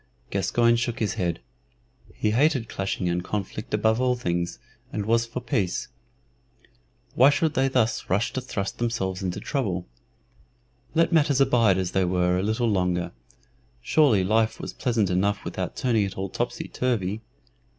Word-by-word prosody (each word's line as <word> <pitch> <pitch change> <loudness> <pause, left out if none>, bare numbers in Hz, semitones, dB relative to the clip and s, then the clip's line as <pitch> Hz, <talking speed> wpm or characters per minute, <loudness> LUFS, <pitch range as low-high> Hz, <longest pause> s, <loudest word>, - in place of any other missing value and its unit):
Gascoyne 115 +5 +2
shook 120 +1 -2
his 110 -6 -1
head. 85 -2 -2 0.7
He 105 - 0
hated 130 0 +2
clashing 95 -3 -2
and 85 0 0
conflict 105 +2 -4
above 110 +2 +2
all 125 -1 +2
things, 85 -7 -2 0.3
and 105 - -3
was 115 +1 +2
for 125 +2 -5
peace. 105 -7 -1 1.2
Why 130 +3 +6
should 155 +1 +1
they 135 -1 +2
thus 125 -3 0
rush 100 +5 +1
to 130 - -2
thrust 100 -6 -4
themselves 100 -6 -1
into 90 -2 -3
trouble? 100 -11 -2 1.1
Let 165 +1 +3
matters 145 -4 +3
abide 115 -8 +4
as 95 -2 -1
they 95 - +2
were 90 0 +1
a - - 0
little 110 +4 0
longer; 90 -4 0 0.7
surely 115 - +3
life 110 +3 +1
was - - -6
pleasant 115 -7 0
enough 100 +3 0
without 95 -1 -4
turning 120 -5 +1
it 95 - -7
all 95 0 -3
topsy 120 +5 -3
turvy. 110 -5 -1
110 Hz, 155 wpm, -25 LUFS, 95-125 Hz, 1.2 s, Why